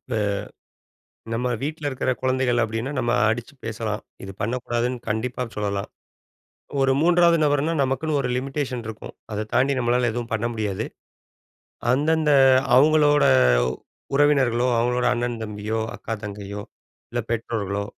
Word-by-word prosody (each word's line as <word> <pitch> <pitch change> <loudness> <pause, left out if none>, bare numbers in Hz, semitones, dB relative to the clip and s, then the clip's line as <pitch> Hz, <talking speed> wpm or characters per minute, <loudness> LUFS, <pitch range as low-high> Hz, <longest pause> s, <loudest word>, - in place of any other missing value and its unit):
இப்ப 125 -3 -5 1.2
நம்ம 125 +2 -1
வீட்ல 150 +1 -3
இருக்கிற 130 -1 -1
குழந்தைகள் 130 -2 +1
அப்டின்னா, 115 +5 -3
நம்ம 120 -1 0 0.2
அடிச்சு 120 +4 -3
பேசலாம். 110 -1 -3 0.2
இது 95 - -6
பண்ணக்கூடாதுன்னு 120 +2 -1
கண்டிப்பா 120 +4 -2
சொல்லலாம். 100 -1 -2 0.9
ஒரு 135 0 +3
மூன்றாவது 170 0 +5
நபர்னா 145 +2 +1
நமக்குன்னு 140 +3 0
ஒரு 125 - -1
லிமிட்டேஷன் 130 -2 -3
இருக்கும். 110 -1 -8 0.2
அத 105 +1 -2
தாண்டி 135 +2 +3
நம்மளால 120 0 +2
எதுவும் 120 -1 -4
பண்ண 115 +1 0
முடியாது. 105 -4 -2 1.1
அந்த, 145 +5 +2
அந்த 150 -1 +2 0.4
அவுங்களோட 150 +1 +5 0.9
உறவினர்களோ, 130 -4 +3
அவுங்களோட 125 +1 +1
அண்ணன், 120 -1 -2
தம்பியோ 105 +1 -3 0.2
அக்கா, 115 - -5
தங்கையோ 100 0 -6 0.5
இல்ல 120 - -1
பெற்றோர்களோ 105 -3 -2
120 Hz, 125 wpm, -23 LUFS, 110-135 Hz, 1.2 s, மூன்றாவது